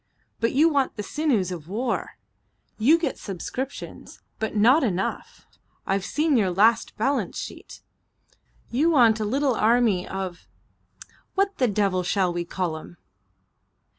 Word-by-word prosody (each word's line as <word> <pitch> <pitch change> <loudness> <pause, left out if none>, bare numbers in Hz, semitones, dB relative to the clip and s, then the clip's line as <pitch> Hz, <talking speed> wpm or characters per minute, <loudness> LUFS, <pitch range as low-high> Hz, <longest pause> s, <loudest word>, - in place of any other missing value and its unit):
But 230 +1 0
you 300 +5 +5
want 280 -5 +1
the 210 - -5
sinews 235 - 0
of 165 -4 -7
war. 235 +5 -3 0.6
You 285 +10 +5
get 335 - -3
subscriptions, 250 +8 -6 0.2
but 220 0 -3
not 245 +9 +5
enough; 195 -5 -3 0.4
I've 195 0 -1
seen 300 +5 +1
your 200 -5 +2
last 215 +5 +2
balance 270 +6 -1
sheet. - - -8 0.9
You 285 +8 +2
want 235 -8 +4
a 215 - -1
little 270 +4 +1
army 220 -4 +2
of 190 -2 -6 0.9
what 395 0 0
the 255 - +3
devil 200 -3 +1
shall 180 0 0
we 175 0 -3
call 175 -2 -3
'em?" 175 +2 -12
220 Hz, 135 wpm, -24 LUFS, 190-270 Hz, 0.9 s, you